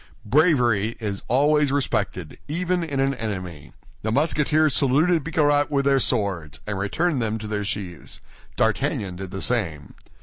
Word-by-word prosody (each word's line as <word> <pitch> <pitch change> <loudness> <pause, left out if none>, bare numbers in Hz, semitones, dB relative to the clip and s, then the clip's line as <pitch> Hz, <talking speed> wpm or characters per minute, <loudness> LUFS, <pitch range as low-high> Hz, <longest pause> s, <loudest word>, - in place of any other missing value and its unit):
Bravery 120 - +3
is 100 -3 -4
always 145 +3 +3
respected, 105 - -2
even 180 +3 -1
in 145 -4 -3
an 135 0 +2
enemy. 90 - -6 0.3
The 110 - -2
Musketeers 150 +2 +2
saluted 155 +4 +3
Bicarat 145 -2 +2
with 140 -2 0
their 135 -1 +4
swords, 100 -11 0
and 105 -2 -3
returned 140 - 0
them 110 -1 -1
to 110 - -8
their 105 -1 -2
sheaths. 100 -6 -6 0.4
D'Artagnan 95 -3 0
did 95 0 -6
the 95 +1 -5
same. 85 - -1
120 Hz, 145 wpm, -23 LUFS, 100-150 Hz, 0.4 s, their